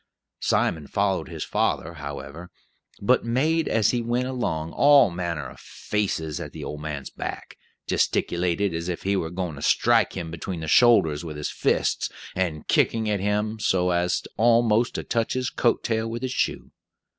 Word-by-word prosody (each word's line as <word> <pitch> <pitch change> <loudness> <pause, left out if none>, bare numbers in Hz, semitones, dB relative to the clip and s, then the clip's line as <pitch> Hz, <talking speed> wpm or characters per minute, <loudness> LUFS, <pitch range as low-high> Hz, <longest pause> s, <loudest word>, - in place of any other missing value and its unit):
Simon 80 -4 0
followed 100 +1 0
his - - -5
father, 85 +2 -1
however, 75 +2 -8 0.5
but 125 +6 +3
made, 150 +7 +1
as 110 -3 +2
he 120 - 0
went 120 +2 0
along, 85 -12 -2
all 140 - +6
manner 85 -4 -3
of - - -13
"faces" 80 -7 -3
at - - -7
the - - -7
old 75 - -6
man's 75 -3 -5
back; - - -6 0.3
gesticulated 90 +2 0
as 85 +2 -3
if 90 - -4
he 100 +1 +1
were 80 -4 -1
going 90 -1 -4
to - - -9
strike - - +3
him 80 -1 -5
between 85 +1 -5
the 80 - -5
shoulders 85 -7 +4
with 80 -3 -6
his 75 - -3
fists, - - 0 0.3
and 85 -5 -2
kicking 110 -1 +2
at 100 - 0
him 105 +2 -1
so 90 -3 +1
as 90 0 0
almost 115 0 +3
to - - -3
touch 115 -1 -1
his 130 0 -2
coat 120 - +1
tail 110 -1 -1
with 120 +2 -5
his 130 - -2
shoe. - - -2
95 Hz, 175 wpm, -25 LUFS, 80-115 Hz, 0.5 s, all